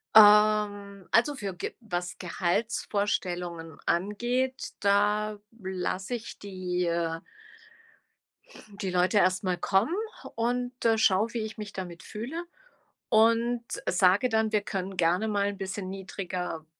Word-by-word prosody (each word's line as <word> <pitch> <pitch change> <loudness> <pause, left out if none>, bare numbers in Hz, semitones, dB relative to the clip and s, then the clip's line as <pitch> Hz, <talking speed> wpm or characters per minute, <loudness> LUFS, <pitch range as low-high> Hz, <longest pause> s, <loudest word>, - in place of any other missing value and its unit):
Ähm. 210 -1 +7 0.2
Also 245 +6 +4
für 200 -5 -4
g - - -4
was 175 -5 -4
Gehaltsvorstellungen 180 -3 -1
angeht, 240 +8 0
da 205 +1 +2 0.2
lasse 190 +3 -3
ich 230 -1 -8
die, 185 -3 -2
äh 170 -1 -1 1.6
die 190 - -1
Leute 180 +3 +2
erst 185 0 +3
mal 185 -1 0
kommen 195 - +2 0.4
und, 245 +2 -1
äh, 225 -1 +4
schaue, 220 +1 +3
wie 235 - -1
ich 220 +1 -8
mich 210 -2 -7
damit 175 -3 -7
fühle. 265 +11 -5 0.6
Und 230 +2 +3 0.2
sage 185 +7 +4
dann, 220 -1 +1
wir 210 -2 +2
können 195 -2 -4
gerne 180 +5 +2
mal 200 -2 +1
'n 200 - -6
bisschen 190 0 -4
niedriger 185 -4 -5
200 Hz, 125 wpm, -28 LUFS, 180-220 Hz, 1.6 s, Ähm